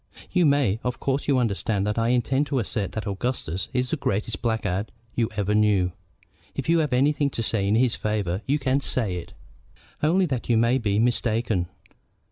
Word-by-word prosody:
"You 180 -3 +4
may. 135 -8 +2
Of 125 0 -2
course 135 +1 -1
you 140 -2 +3
understand 105 -3 0
that 105 +2 0
I 115 - +1
intend 130 +4 +1
to 140 - -1
assert 105 -4 -2
that 110 - -4
Augustus 100 -4 -3
is 125 -1 -1
the 160 - 0
greatest 105 -4 -2
blackguard 110 -4 -1 0.2
you 115 -2 0
ever 105 0 0
knew. 105 -4 +3 0.6
If - - -4
you 165 0 +4
have 150 -3 0
anything 140 +3 +2
to 115 - -3
say 105 -3 +1
in 105 - +3
his 120 0 +3
favor 105 -3 -1
you 140 +2 +2
can 135 -1 +1
say 110 -9 -1
it." 85 - -8 0.7
"Only 180 +5 +3
that 130 -8 -3
you 115 - +4
may 115 +3 +3
be 105 -4 0
mistaken. 115 -4 +1
115 Hz, 190 wpm, -25 LUFS, 105-130 Hz, 0.7 s, You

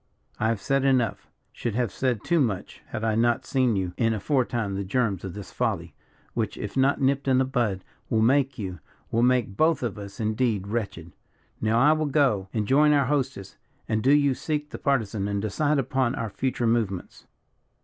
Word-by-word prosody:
I 110 - +1
have 115 -2 0
said 135 +6 0
enough 130 -6 +1 0.2
should 115 -3 -3
have 120 -5 0
said 125 0 -1
too 170 -1 +2
much 105 -9 -2
had 110 -1 -5
I 110 -1 +1
not 120 +3 +2
seen 130 -2 +2
in 110 - +1
you 95 -2 -2 0.2
aforetime 120 -3 0
the 100 +1 -2
germs 100 -1 0
of 95 -2 -6
this 105 -2 -8
folly, - - -2 0.4
which, 110 -3 -2
if 105 - -6
not 135 +1 +3
nipped 135 0 +1
in 130 -1 +4
the 130 - +3
bud, 115 -8 -1 0.3
will 110 -1 +2
make 135 +2 +2
you, 95 -5 -5 0.3
will 115 - +2
make 125 -5 +2
both 155 0 +2
of 105 -4 -3
us 100 -1 -9
indeed 110 -2 0
wretched. 100 -7 -4 0.5
Now 110 +1 +2
I 145 +5 +6
will 155 -1 +1
go 130 -10 +2
and 105 -2 -2
join 150 +4 +5
our 140 -2 +3
hostess; 130 -8 -2 0.3
and 110 -1 0
do 135 - +3
you 145 -2 +4
seek 150 +2 -3
the - - -7
Partisan 110 -7 0
and 100 -1 -1
decide 145 +9 0
upon 130 -2 0
our 115 -2 -4
future 125 0 -1
movements." 110 -6 -1
120 Hz, 195 wpm, -26 LUFS, 105-135 Hz, 0.5 s, I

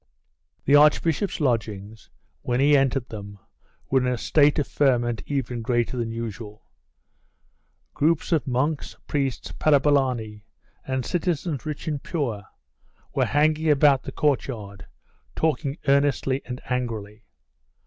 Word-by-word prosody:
The 140 - +5
archbishop's 155 +6 +3
lodgings, 110 -5 -2 0.3
when 125 0 -1
he 145 +2 +5
entered 135 -2 +1
them, 100 -2 -8 0.5
were 135 - +4
in 125 - -1
a 125 - -1
state 150 +4 +3
of 145 - 0
ferment 120 -5 +1
even 130 -4 -2
greater 120 +1 0
than 120 -2 -2
usual. 110 -2 -7 1.3
Groups 160 +3 +1
of 160 -4 +1
monks, 140 +4 -1
priests, 135 -3 -2
parabolani, 135 -8 +1 0.4
and 130 -2 -2
citizens 170 -4 -2
rich 150 +1 -5
and 150 -3 -2
poor, 120 - -3 0.7
were - - +2
banging 155 +2 +2
about 145 -2 +5
the - - -7
courtyard, 115 -9 -2 0.5
talking 155 -2 -1
earnestly 140 -1 +2
and 125 0 -6
angrily. 110 -4 -4
135 Hz, 120 wpm, -24 LUFS, 115-145 Hz, 1.3 s, The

